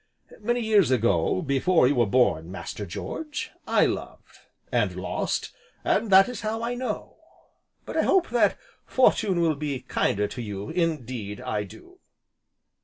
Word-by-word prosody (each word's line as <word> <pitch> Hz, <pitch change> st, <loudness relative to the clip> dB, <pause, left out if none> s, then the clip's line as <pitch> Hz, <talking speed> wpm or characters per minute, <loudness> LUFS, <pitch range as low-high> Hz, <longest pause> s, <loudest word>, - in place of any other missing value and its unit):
Many 240 Hz, +3 st, 0 dB
years 215 Hz, -, +4 dB
ago, 115 Hz, -, +2 dB
before 140 Hz, +2 st, +3 dB
you 140 Hz, -, +3 dB
were 120 Hz, -5 st, +2 dB
born, 90 Hz, -8 st, +2 dB
Master 100 Hz, +1 st, -6 dB
George, 300 Hz, -, -5 dB, 0.2 s
I -, -, +4 dB
loved -, -, -5 dB, 0.3 s
and -, -, +1 dB
lost, -, -, -2 dB, 0.3 s
and 230 Hz, -, +1 dB
that 195 Hz, 0 st, +7 dB
is 250 Hz, -4 st, -6 dB
how 220 Hz, +1 st, -3 dB
I 235 Hz, +1 st, -1 dB
know. 250 Hz, +1 st, -5 dB, 0.7 s
But -, -, -5 dB
I -, -, +4 dB
hope 375 Hz, -3 st, +2 dB
that 240 Hz, -, +3 dB, 0.3 s
Fortune 210 Hz, -8 st, +2 dB
will 165 Hz, -2 st, +3 dB
be 140 Hz, -3 st, -4 dB
kinder 105 Hz, -5 st, 0 dB
to 125 Hz, -, -7 dB
you, 100 Hz, -2 st, -5 dB
indeed 130 Hz, -, -2 dB
I 105 Hz, -1 st, -2 dB
do." 360 Hz, -, -15 dB
150 Hz, 150 wpm, -26 LUFS, -, 0.7 s, that